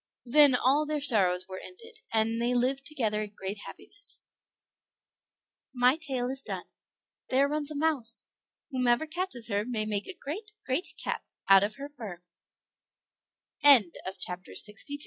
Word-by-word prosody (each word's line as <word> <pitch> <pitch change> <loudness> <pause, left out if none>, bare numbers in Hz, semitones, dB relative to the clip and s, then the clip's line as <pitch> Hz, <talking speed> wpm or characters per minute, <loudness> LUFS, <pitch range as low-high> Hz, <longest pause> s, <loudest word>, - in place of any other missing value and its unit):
Then 285 +1 +7
all 280 +5 +2
their 305 0 -1
sorrows 185 -9 +4
were 185 -1 -7
ended, 455 +4 -13
and 225 +1 +1
they 245 +1 +1
lived 265 +3 0
together 220 -8 -1
in 210 -1 -7
great 195 +2 -5
happiness. 410 0 -11 1.5
My 250 +2 +4
tale 265 -6 -3
is 270 0 -1
done. - - -5 0.7
There 270 +2 +3
runs 300 0 -3
a 305 - -6
mouse; 285 -7 +1 0.5
whoever 250 +2 +2
catches 320 -7 -3
her 205 0 0
may 220 -2 -3
make 205 -1 -2
a 375 - -7
great, 415 +9 -7
great 270 +7 -1
cap - - -3 0.2
out 195 0 +7
255 Hz, 125 wpm, -29 LUFS, 225-305 Hz, 1.5 s, Then